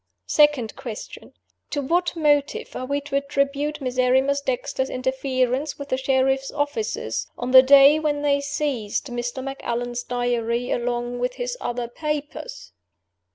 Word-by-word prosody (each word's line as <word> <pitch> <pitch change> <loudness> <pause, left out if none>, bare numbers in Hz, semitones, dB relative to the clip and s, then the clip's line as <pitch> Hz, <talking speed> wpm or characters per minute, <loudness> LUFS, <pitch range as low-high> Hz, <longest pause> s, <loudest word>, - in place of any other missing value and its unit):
"Second 295 -7 +3
Question: 245 -5 -8 0.4
To 290 - -2
what 345 +6 0
motive 295 -3 +1
are 255 - -4
we 285 +1 -1
to 285 -1 -5
attribute 280 +1 -1
Miserrimus 260 +2 +2
Dexter's 265 0 -2
interference 260 +2 -1
with 280 0 -8
the 260 - +1
sheriff's 265 0 +1
officers, 295 +9 -2
on 245 +1 -3
the 260 0 +10
day 280 +3 +7
when 295 -2 -1
they 280 -1 +2
seized 275 -7 -2
Mr. 240 +2 -4
Macallan's 245 -3 -3
Diary 245 -1 -1
along 240 0 -2
with 250 +1 -1
his - - -3
other 240 0 -3
papers? 300 - -5
270 Hz, 135 wpm, -23 LUFS, 245-290 Hz, 0.4 s, the